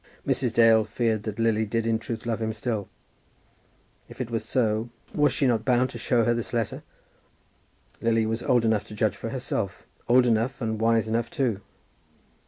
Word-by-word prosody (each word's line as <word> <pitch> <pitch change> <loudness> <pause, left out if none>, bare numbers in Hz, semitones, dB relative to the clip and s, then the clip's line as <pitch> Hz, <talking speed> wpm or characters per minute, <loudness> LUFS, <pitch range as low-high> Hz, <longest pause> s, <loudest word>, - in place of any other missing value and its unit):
Mrs. 125 -4 0
Dale 115 -1 +6
feared 110 0 -1
that 110 -2 -4
Lily 115 -1 +2
did 115 +1 -1
in 115 -1 +1
truth 115 0 -6
love 115 -1 -2
him 110 0 -1
still. 110 -2 -3 1.2
If - - -13
it 120 -2 -4
was 115 -2 -1
so, 110 -1 0 0.2
was 150 0 +3
she 140 - 0
not 115 -4 +2
bound 125 0 +2
to 120 - -8
show 115 +1 +2
her 120 - +2
this 120 0 -4
letter? 115 -3 -2 1.2
Lily 115 -1 +2
was 110 +2 -2
old 120 -2 +2
enough 110 -2 +1
to 105 - -10
judge - - +1
for - - -5
herself, - - -3 0.2
old 125 +1 +6
enough, 120 +3 +1
and 110 -3 -2
wise 115 -1 +3
enough 115 +1 -1
too. 130 - -1
115 Hz, 185 wpm, -26 LUFS, 110-120 Hz, 1.2 s, Dale